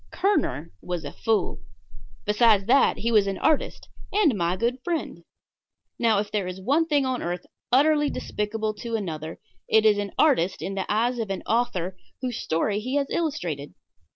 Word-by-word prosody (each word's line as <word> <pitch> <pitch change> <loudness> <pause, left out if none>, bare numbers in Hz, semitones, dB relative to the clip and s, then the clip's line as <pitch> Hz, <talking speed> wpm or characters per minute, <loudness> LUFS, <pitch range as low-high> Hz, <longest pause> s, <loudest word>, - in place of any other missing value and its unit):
Kerner 355 - 0
was 175 -3 -4
a 145 - -5
fool. 225 -2 0 0.7
Besides 210 -1 +4
that, 265 +5 +4
he 235 - -1
was 210 -3 +4
an 195 -1 -2
artist 315 -2 0 0.2
and 390 -9 +3
my 175 -1 0
good 240 +4 0
friend. 340 -2 -3 0.8
Now, 225 -3 +3
if 205 +1 -2
there 205 -3 -1
is 185 +1 -6
one 285 - +2
thing 290 -3 +2
on 255 -1 -1
earth 175 +1 -3 0.3
utterly 295 +3 +4
despicable 215 +1 -3
to 235 -2 -3
another, 160 -6 -4 0.3
it 220 0 +4
is 210 -1 +5
an 205 -1 -4
artist 245 - +2
in 195 - -3
the 195 -1 -3
eyes 235 +3 +1
of 220 -3 -2
an 195 - -3
author 205 -6 0 0.2
whose 250 -3 -3
story 200 +6 0
he 255 +5 -3
has 280 -1 0
illustrated. 175 - -2
220 Hz, 175 wpm, -25 LUFS, 190-260 Hz, 0.8 s, is